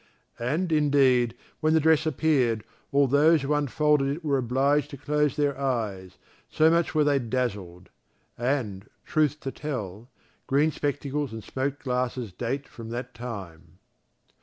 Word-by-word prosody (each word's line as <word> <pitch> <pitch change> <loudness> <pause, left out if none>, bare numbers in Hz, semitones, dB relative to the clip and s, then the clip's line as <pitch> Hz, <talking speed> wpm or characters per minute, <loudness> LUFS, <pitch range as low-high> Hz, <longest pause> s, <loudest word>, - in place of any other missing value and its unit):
And, 155 +9 -1
indeed, 135 -6 +3 0.2
when 155 0 +2
the - - +5
dress 160 0 +3
appeared, 130 -7 +1 0.3
all 140 0 +4
those 150 +3 +4
who 140 +2 0
unfolded 150 0 +2
it 165 - -12
were 140 -2 +2
obliged 135 +4 +1
to 140 - -8
close 150 +1 0
their 145 -2 +1
eyes, 110 -9 -2 0.3
so 160 +1 +4
much 170 -1 +1
were 155 - +4
they 145 -1 +3
dazzled. 105 -8 -3 0.5
And, 120 -6 -2 0.2
truth 150 -1 +1
to 135 - -4
tell, 115 -7 -6 0.4
green 145 +3 +3
spectacles 145 -1 -2
and 110 -1 -7
smoked 140 +3 -3
glasses 125 -4 -2
date 130 +7 -3
from 115 -1 -10
that 120 +2 -5
time. 95 -8 -8
135 Hz, 145 wpm, -26 LUFS, 120-150 Hz, 0.5 s, the